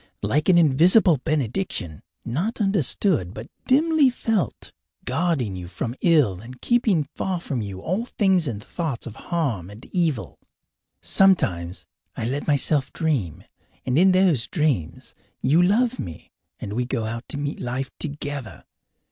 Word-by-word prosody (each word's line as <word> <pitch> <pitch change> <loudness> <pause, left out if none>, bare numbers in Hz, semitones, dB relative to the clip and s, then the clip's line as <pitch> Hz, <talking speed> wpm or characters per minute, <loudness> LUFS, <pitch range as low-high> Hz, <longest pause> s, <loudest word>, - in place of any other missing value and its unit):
Like 145 - +1
an 180 - +6
invisible 170 +4 +5
benediction, 135 - -2 0.2
not 170 - -2
understood 185 - +1
but 110 - -7 0.2
dimly 300 +1 +4
felt, 225 -5 -2 0.3
guarding 130 - 0
you 90 -1 -7
from 95 +7 -4
ill 150 - +3
and 125 +2 -11
keeping 220 - +2
far 180 +5 -3
from 135 -7 -3
you 100 -2 -6
all 195 - -2
things 190 -8 +2
and 105 -4 -4
thoughts 155 -9 -4
of 115 - -8
harm 130 - -1
and 105 +4 -12
evil! 155 - -1 0.6
Sometimes 90 - +2 0.3
I - - -2
let 135 +5 -3
myself 145 -2 +1
dream. 135 - -1 0.4
And 125 - 0
in 190 +1 +6
those 185 -9 +3
dreams 130 - -1 0.3
you 150 +7 +3
love 230 +7 +2
me, 85 -4 -8 0.3
and 100 - -5
we 125 +3 0
go 120 -2 -2
out 115 +2 -5
to 145 - -4
meet 145 0 -3
life 130 +2 -3
together. 145 -4 -5
145 Hz, 145 wpm, -23 LUFS, 115-180 Hz, 0.6 s, an